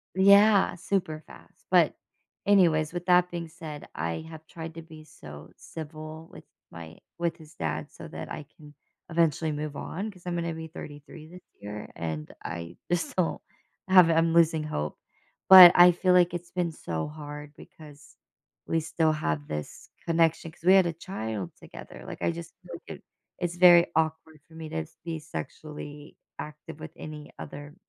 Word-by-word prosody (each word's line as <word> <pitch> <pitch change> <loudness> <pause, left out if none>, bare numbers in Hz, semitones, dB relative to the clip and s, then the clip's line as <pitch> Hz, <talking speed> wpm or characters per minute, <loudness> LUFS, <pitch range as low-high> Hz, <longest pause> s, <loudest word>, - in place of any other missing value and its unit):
Yeah, 200 +1 +6
super 170 -4 -2
fast. - - -17
But, - - +5 0.5
anyways, 165 -6 +4
with 175 0 -5
that 180 0 +5
being 170 -1 -5
said, 155 -3 -9
I 85 - -3
have 160 -1 -11
tried 165 -2 -8
to 165 - -7
be 160 -1 -13
so 75 - -12
civil 155 0 -9
with - - -12 0.3
my 85 -1 -10 0.2
with 170 0 -1
his 155 -1 -15
dad 80 -1 -3
so - - -10
that - - -8
I 145 - -6
can 150 -2 -15 0.4
eventually 160 -1 +1
move 150 0 -4
on. 200 +9 -5
'Cause 180 -3 -19
I'm 175 -1 -2
gonna 170 -1 -2
be 160 0 -7
33 150 0 -11
this 180 +2 -13 0.2
year, 105 +1 -7
and 80 -2 -5
I 85 0 -6
just 175 -1 -1
don't 180 -3 0 0.5
have 185 -3 +7
a 165 - +3
I'm 165 0 +3
losing 165 -2 +4
hope. 75 - -4 0.5
But 185 -2 +13
I 175 0 +9
feel 180 +1 +2
like 180 -1 +4
it's 175 0 -6
been 175 -2 -1
so 80 - -4
hard 150 -1 -9
because 150 -1 -15 0.5
we 165 - +1
still 160 0 +1
have 75 - -2
this 75 -1 -7 0.2
connection 165 -1 +1
'cause 165 - -24
we 185 +2 +6
had 190 -2 +6
a 170 - 0
child 110 - -5
together, - - -12
like, - - -8
I 85 0 +1
just 85 0 -9
feel - - -11
like - - -10
it - - -30 0.4
it's 175 -1 -2
very 175 -1 +8
awkward 160 -1 -1
for 160 - -17
me 160 -1 -7
to 160 +1 -3 0.2
be 165 -2 -4
sexually 150 -1 -8 0.2
active 150 0 -9
with 160 - -8
any 150 -1 -9
other 145 +1 -9
160 Hz, 175 wpm, -27 LUFS, 150-170 Hz, 0.5 s, But